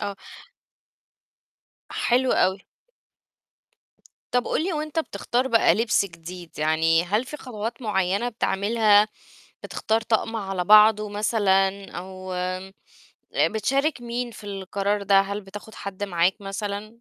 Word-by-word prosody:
آه. 200 -1 -4 1.7
حلو 250 +1 +1
أوي. 190 +1 +1 1.7
طَب 245 -1 +1
قُل 315 - 0
لي 375 - -1
وأنت 310 0 -3
بتختار 250 -2 -1
بقى 230 -8 +4
لِبس 220 0 +2
جديد 175 -1 -10
يعني 160 +2 +3
هل 210 +7 0
في 300 - -7
خطوات 230 -2 -6
معيّنة 200 +1 0
بتعملها؟ 215 -1 +3 0.5
بتختار 220 +1 -1
طقم 225 0 0
على 195 -4 -3
بعضه 210 +1 +6
مثلًا؟ 200 -2 +1
أو 185 0 -7 1.0
بتشارك 270 +7 +1
مين 240 +1 -3
في 215 -2 -12
القرار 200 +1 -2
ده، 195 0 +5
هل 200 +1 -3
بتاخد 205 +2 -11
حَد 200 -2 -5
معاك 180 +1 +1
مثلًا؟ 200 +1 -4
205 Hz, 115 wpm, -24 LUFS, 195-230 Hz, 1.7 s, بعضه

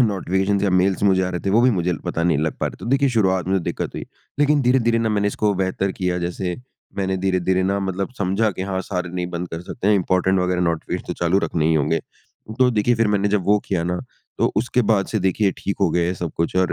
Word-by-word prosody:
Notifications 100 -2 +1
या 100 - +2
mails 95 +1 +2
मुझे 95 -2 +4
आ 90 - 0
रहे 90 - -3
थे 100 - +1
वो 110 +4 +4
भी 130 - +5
मुझे 90 -4 0
पता 85 - -2
नहीं 85 -3 +2
लग 80 +1 -1
पा - - 0
रहे - - -3
थे। - - -13
तो - - -7
देखिए 140 +1 +3
शुरुआत 95 -6 +1
में 95 -2 +1
दिक्कत - - -4
हुई - - -5 0.3
लेकिन 145 0 +3
धीरे-धीरे 120 -2 +3
न 115 - 0
मैंने 105 0 +1
इसको 105 0 0
बेहतर 95 0 -1
किया 90 -1 -1
जैसे 90 +1 -3 0.4
मैंने 95 -1 -1
धीरे-धीरे 95 0 +1
ना, 100 +1 0
मतलब 95 +3 -3
समझा 100 +3 +1
कि 95 - -5
हाँ, 95 -1 -2
सारे 90 -2 -3
नहीं 90 0 -3
बंद 90 0 -4
कर 80 - -6
सकते 100 +2 -5
हैं 105 - +5
इम्पोर्टेंट 95 0 +2
वग़ैरह 90 0 0
नोटिफ़िकेशन 85 -2 -2
तो - - -3
चालू 85 +3 +3
रखने 80 -2 0
ही 80 - +3
होंगे। 80 +2 +1 0.6
तो 130 -1 +5
देखिए 115 +1 +2
फिर 115 -1 +2
मैंने 100 -1 +1
जब 100 -2 +1
वो 105 +2 +4
किया 90 -4 0
ना 90 +1 -1 0.4
तो - - +2
उसके 125 +3 +1
बाद 105 -3 +2
से 110 - -1
देखिए 95 +2 +2
ठीक 100 - -3
हो 95 - +4
गए 85 +2 +1
सब 85 -3 -4
कुछ 85 +1 -1
और 95 -1 +2
95 Hz, 250 wpm, -21 LUFS, 90-105 Hz, 0.6 s, भी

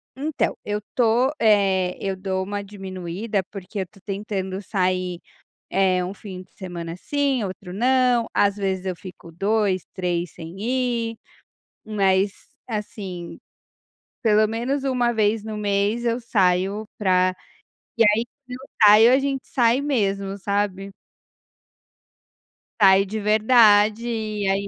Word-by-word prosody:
Então, 295 +3 -1
eu 210 0 -1
estou 240 +4 +1
eh, 195 -4 +3
eu 195 -1 -2
dou 190 0 -2
uma 205 +1 -4
diminuída 195 +1 -4
porque 195 +1 -7
eu - - 0
estou 190 +2 -17
tentando 195 -1 -4
sair, 185 -3 -1 0.5
eh, 185 -2 +2
1 190 - -5
fim 190 -2 -9
de - - -29
semana 170 -3 -6
sim, 275 +2 -1
outro 185 -1 -7
não, 250 +1 +2
às 200 0 +3
vezes 190 -2 -2
eu 185 -2 -2
fico 180 -1 -12
2, 195 -1 0
3 175 -2 -2
sem 165 +1 -10
ir, 235 -1 -1 0.7
mas, 195 -2 +1 0.3
assim, 195 -5 -6 0.9
pelo 215 -1 +4
menos 245 +6 -2
uma 250 -3 +1
vez 215 0 +1
no 220 -1 -5
mês 205 +2 0
eu 235 +1 0
saio 195 -1 +1
pra 185 -2 +2 0.6
e 230 - +5
aí, 215 +2 +4 0.2
quando 250 0 -7
eu 270 - -12 0.2
saio 220 +4 +8
a 265 - +5
gente 275 -1 -2
sai 245 0 +2
mesmo, 200 -8 -1
sabe. 200 0 -2 1.9
Saio 195 0 +6
de 215 +3 -4
verdade 215 +1 +4
e 215 -3 -2
aí 195 +1 0
205 Hz, 135 wpm, -23 LUFS, 190-225 Hz, 1.9 s, saio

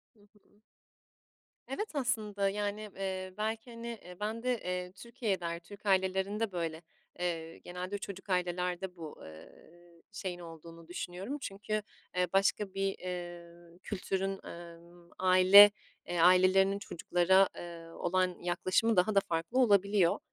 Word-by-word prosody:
Hı 215 - -27
hı. 210 0 -28 1.1
Evet 415 +11 -4
aslında, 210 -7 0
yani, 210 +1 -3
eee, 185 -1 -4
belki, 225 +2 -3
hani, 230 0 -8 0.2
eee, 180 0 -11
ben 220 +3 -3
de, 250 -1 +1
eee, 180 0 -3
Türkiye'de, 190 -6 -3
Türk 205 +4 -14
ailelerinde 195 +3 +1
böyle, 165 -2 -3 0.4
eee, 165 -2 -3
genelde 180 +3 -5
çocuk 195 0 -8
ailelerde 180 0 -1
bu, 160 -3 -9
eee, 80 0 -12 0.6
şeyin 185 -3 -5
olduğunu 165 0 -11
düşünüyorum. 180 +9 -5
Çünkü, 210 0 -3 0.3
eee, 180 0 +2
başka 195 0 +2
bir, 195 0 -1
eee, 175 -1 -8
kültürün, 195 -1 -3
ımm, 170 0 -12
aile, 185 +2 +9 0.4
eee, 175 -1 -2
ailelerinin 185 +3 +5
çocuklara, 190 -1 +3
eee, 170 -1 -8
olan 180 +2 0
yaklaşımı 185 +5 +1
daha 200 +4 +3
da 195 - +8
farklı 170 +8 -1
olabiliyor. 200 -5 +4
185 Hz, 125 wpm, -32 LUFS, 175-205 Hz, 1.1 s, aile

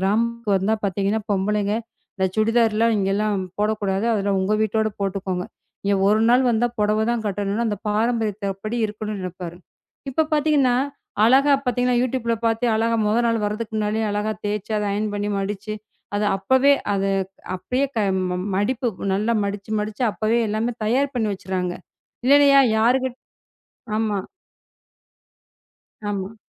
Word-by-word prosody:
கிராமத்திற்கு 225 +2 +1
வந்தால் 215 +3 0
பார்த்தீங்கன்னா, 200 +3 0
பொம்பளைங்க 205 +1 0 0.4
இந்த 190 -1 +1
சுடிதார் 225 0 +3
லாம் 230 -1 +4
இங்கு 195 0 +1
எல்லாம் 210 -1 0 0.2
போடக் 215 +1 0
கூடாது. 195 +3 0
அதெல்லாம் 200 -2 0
உங்கள் 215 +2 +1
வீட்டோடு 220 +1 +1
போட்டுக்கொள்ளுங்கள். 190 -2 -2 0.4
இங்கு 200 -1 +2
ஒரு 215 +1 +3
நாள் 255 +2 +5
வந்தால் 240 +1 +1
புடவைதான் 220 +2 +1
கட்ட 200 -1 -3
வேண்டுமென்று 215 +4 0
அந்த 205 - -2
பாரம்பரியத்தின்படி 215 -1 -1
இருக்கவேண்டுமென்று 210 -1 -5
நினைப்பார். 175 -1 -7 0.5
இப்போ 315 +5 +2
பார்த்தீங்கன்னா 290 -5 +3 0.5
அழகா 270 +5 +5
பாத்தீங்கன்னா 250 0 +1
Youtubeல 240 -2 0
பார்த்தே 225 +1 +1
அழகாக 230 +1 +1
முதல் 230 +3 +2
நாள் 230 -1 +1
வருவதற்கு 215 +1 -3
முன்னாலேயே 215 +1 0
அழகாக 210 +1 -1
தேய்ச்சு, 210 +1 -3
அதை 210 -1 -1
அயன் 210 +1 -1
பண்ணி, 205 0 -2
மடிச்சு 205 +2 -4 0.4
அதை 210 0 +1
அப்பவே, 260 +8 +4 0.2
அதை 195 0 0 0.4
அப்படியே 255 +9 -1
க - - +2 0.3
மம் 180 +2 -3
மடிப்பு 245 +5 0 0.3
நல்லா 215 +4 +1
மடிச்சு, 200 +1 -5
மடிச்சு 210 +3 -2
அப்பவே 220 +3 0
எல்லாமே 220 +3 -1
தயார் 270 +5 +1
பண்ணி 220 -4 0
வைத்துவிடுகிறார்கள். 185 -2 -3 0.4
இல்லன்னா 285 +1 +6
யா 275 - +8 0.2
யாறுகட் 250 +3 +2 0.8
ஆமா. 215 -3 0 1.9
ஆமா. 200 +1 -4
215 Hz, 145 wpm, -22 LUFS, 200-235 Hz, 1.9 s, யா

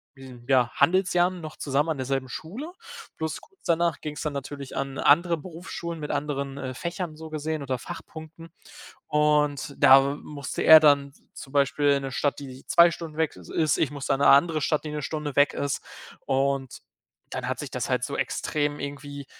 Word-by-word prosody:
hm, 130 -3 -13
ja 130 -3 +3
Handelsjahren 180 0 +2
noch 155 -1 -8
zusammen 145 +3 0
an 155 - -1
derselben 130 0 -2
Schule, 225 - -7 0.5
plus 160 -1 -3
kurz 390 - -23
danach 170 -2 +1
ging 150 -1 -5
es - - -6
dann 150 - -2
natürlich 140 0 -6
an 135 0 -3
andere 170 +3 +4
Berufsschulen 170 0 -7
mit 150 - -4
anderen, 140 -2 -3
äh, 130 -2 -5
Fächern 170 +2 -5
so 160 0 -9
gesehen 155 0 -3
oder 130 -2 -2
Fachpunkten. 160 +4 -10 0.6
Und 150 -2 +1
da 135 +1 +6
musste 145 -3 -5
er 160 0 +10
dann 140 -2 +3 0.2
zum 135 - -11
Beispiel 145 +1 +2
in 140 -1 +1
'ne 135 - -4
Stadt, 145 +1 -1
die 130 -2 -10
2 170 0 +6
Stunden 165 -2 -8
weg 160 -2 0
i - - -11
ist. 155 -2 +2
Ich 145 - +1
musste 140 -1 -2
dann 135 - -2
in - - +4
'ne - - +9
andere 155 +2 +4
Stadt, 150 +1 0
die 150 - -4
'ne 150 0 -4
Stunde 150 0 -4
weg 145 0 +4
ist. 140 0 -2 0.4
Und 135 -1 -1 0.5
dann - - -4
hat - - -3
sich - - -5
das - - -3
halt - - 0
so - - -5
extrem 145 -1 -1
irgendwie 140 0 -7
145 Hz, 195 wpm, -26 LUFS, 140-160 Hz, 0.6 s, er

